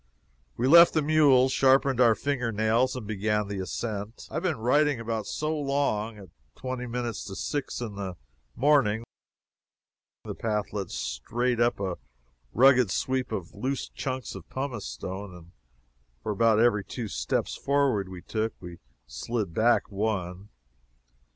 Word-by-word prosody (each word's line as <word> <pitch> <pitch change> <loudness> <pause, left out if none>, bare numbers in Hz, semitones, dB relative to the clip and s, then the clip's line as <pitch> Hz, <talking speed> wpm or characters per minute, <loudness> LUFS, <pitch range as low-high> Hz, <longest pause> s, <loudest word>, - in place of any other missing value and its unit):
We 125 - +1
left 170 +4 +8
the 155 - +3
mules, 140 -4 +5
sharpened 135 -1 +3
our 115 -3 +6
finger 125 -4 -1
nails, 110 +4 +1
and 125 -4 -6
began 105 0 -1
the 100 -1 -4
ascent 105 +3 -5
I - - -12
have 160 - -1
been 170 -6 0
writing 140 +4 +2
about 115 -2 -3
so 155 +1 -2
long, 140 -7 -1
at 95 -3 -12 0.3
twenty 130 -1 -5
minutes 120 -2 -3
to 95 -1 -7
six 145 +5 -3
in 115 -4 -4
the 95 -3 -4 0.4
morning. 120 -5 +3 1.2
The - - -5
path 105 -3 -2
led 100 -4 -3
straight 115 - -2
up 120 -2 +2
a 95 -3 -3 0.5
rugged 125 -2 +5
sweep 130 +6 -1
of 95 -6 -5
loose 135 +2 -3
chunks 130 -3 -4
of 95 -4 -10
pumice 130 -6 -4
stone, 95 0 -6
and 85 0 -14 0.7
for - - -2
about 110 +1 +3
every 115 -4 +3
two 115 +3 -5
steps - - -2
forward 135 -9 +1
we 90 -2 -9
took, 110 0 -3
we 85 -1 -10 0.3
slid 95 - -4
back 115 +4 +2
one. 100 -2 -3
115 Hz, 150 wpm, -27 LUFS, 100-130 Hz, 1.2 s, left